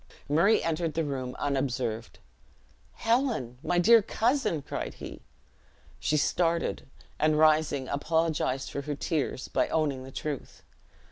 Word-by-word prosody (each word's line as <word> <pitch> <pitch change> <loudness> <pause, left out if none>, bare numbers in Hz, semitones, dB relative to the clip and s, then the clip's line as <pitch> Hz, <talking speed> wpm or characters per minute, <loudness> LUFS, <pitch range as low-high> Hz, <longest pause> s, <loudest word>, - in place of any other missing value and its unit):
Murray 170 +9 +4
entered 165 -1 -1
the 165 - +1
room 130 -4 -4
unobserved. 125 -5 -2 0.8
"Helen! 225 - 0
my 175 - 0
dear 225 +6 +7
cousin!" 225 - 0
cried - - -5
he. - - -9 0.8
She 150 - +1
started, 170 +1 0 0.3
and 155 0 +3
rising, 155 -3 +3
apologized 145 -3 0
for 140 - -3
her 145 +1 -4
tears 145 -2 -2
by - - +1
owning 145 -5 0
the 130 - -10
truth. 145 -1 -5
150 Hz, 125 wpm, -28 LUFS, 135-165 Hz, 0.8 s, dear